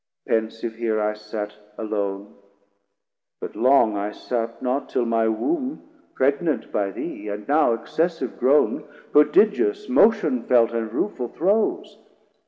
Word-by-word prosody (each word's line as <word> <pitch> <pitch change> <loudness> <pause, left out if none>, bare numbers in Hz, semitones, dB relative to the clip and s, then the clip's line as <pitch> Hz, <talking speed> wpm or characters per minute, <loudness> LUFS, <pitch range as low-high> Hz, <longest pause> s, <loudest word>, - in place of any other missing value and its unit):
Pensive 115 +1 -1
here 110 -1 -1
I 105 0 0
sat 105 0 -6 0.2
Alone, 100 -2 -3 1.1
but - - -7
long 125 -4 +4
I 100 +1 -2
sat 115 +1 -4
not, 130 +2 -2
till 120 - 0
my 115 -1 +1
womb 270 - -2 0.3
Pregnant 140 +4 0
by 100 -2 0
thee, 100 +2 -6
and 105 0 -5
now 145 -5 +3
excessive 165 +9 -2
grown 140 +3 +3 0.3
Prodigious 215 - +3
motion 170 - +3
felt 120 -1 +3
and 115 -2 -3
rueful 125 - -2
throes. 215 - 0
120 Hz, 125 wpm, -23 LUFS, 110-155 Hz, 1.1 s, long